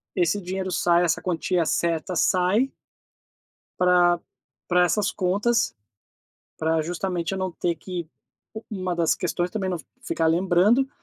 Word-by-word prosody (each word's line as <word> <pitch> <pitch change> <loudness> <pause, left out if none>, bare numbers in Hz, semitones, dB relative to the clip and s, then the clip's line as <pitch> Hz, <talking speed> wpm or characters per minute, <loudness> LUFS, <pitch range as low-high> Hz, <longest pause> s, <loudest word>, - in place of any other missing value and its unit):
esse 180 +2 +1
dinheiro 185 +1 -3
sai, 175 0 +3
essa 165 - 0
quantia 180 0 0
certa 170 +2 0
sai 185 - +2 1.1
pra 175 -1 +4 0.5
pra 180 0 +4
essas 190 +4 +1
contas, 205 +6 +1 0.8
pra 160 0 +1
justamente 175 +1 -3
eu 190 - -3
não 185 -1 -2
ter 170 0 -1
que 170 0 -6 0.4
u 220 +1 -8
uma 185 -3 -2
das 170 -2 +2
questões 175 0 -2
também, 195 -4 -2
não 180 - -1 0.2
ficar 165 - -1
lembrando, 185 +10 +3
180 Hz, 135 wpm, -24 LUFS, 170-190 Hz, 1.1 s, pra